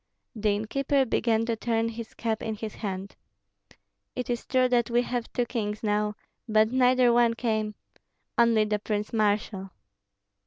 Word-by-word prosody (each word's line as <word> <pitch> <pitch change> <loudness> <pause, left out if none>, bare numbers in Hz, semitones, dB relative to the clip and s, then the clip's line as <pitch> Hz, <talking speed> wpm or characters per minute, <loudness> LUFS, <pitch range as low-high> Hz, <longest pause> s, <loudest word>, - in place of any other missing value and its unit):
The 215 -1 0
innkeeper 265 +7 +1
began 225 -1 +1
to 230 -1 0
turn 225 0 0
his 230 0 -8
cap 225 -2 -2
in 220 -1 -3
his 215 0 -6
hand. 195 -2 -5 1.0
"It 250 0 -3
is 240 - -3
true 255 -1 +3
that 245 -2 +2
we 240 +1 +2
have 245 -1 -3
two 245 - 0
kings 215 -3 -3
now, 210 0 0 0.3
but 215 +1 +4
neither 255 -1 +4
one 235 -1 +4
came, 220 -3 -1 0.6
only 230 -2 +4
the 210 0 0
prince 210 +1 -3
marshal." 205 -2 0
225 Hz, 155 wpm, -27 LUFS, 210-240 Hz, 1.0 s, but